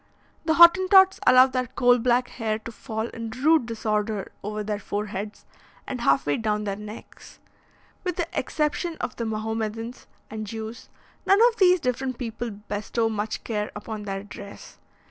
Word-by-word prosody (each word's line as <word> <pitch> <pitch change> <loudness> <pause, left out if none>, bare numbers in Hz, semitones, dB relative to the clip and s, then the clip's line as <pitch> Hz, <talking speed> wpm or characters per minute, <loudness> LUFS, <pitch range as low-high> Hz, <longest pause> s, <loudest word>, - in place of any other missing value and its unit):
The 320 -1 +2
Hottentots 375 +3 +7
allow 255 0 +8
their 255 -1 -2
coal 245 +1 +3
black 245 +1 +2
hair 220 -3 -2
to 225 +1 -9
fall 220 -1 -4
in 230 -1 -6
rude 265 +3 +2
disorder 215 -2 -2
over 210 +1 -4
their 210 0 -3
foreheads 205 +1 -5 0.4
and 250 -3 -5
half 135 -8 +3
way 145 0 +1
down 210 -1 -1
their 200 -2 -2
necks. 210 +2 -11 0.7
With 360 -2 -2
the 345 -2 -2
exception 315 +2 -1
of - - -5
the 235 - -2
Mahomedans 220 +2 -4 0.2
and 215 -1 -5
Jews, 220 +2 -7 0.4
none 390 - +6
of 465 - -10
these 365 -2 +5
different 255 -1 -2
people 235 -1 -4
bestow 210 +2 -2
much 215 0 -3
care 210 -2 -3
upon 210 +1 -6
their 195 -1 -4
dress. 200 0 -11
225 Hz, 160 wpm, -25 LUFS, 210-255 Hz, 0.7 s, allow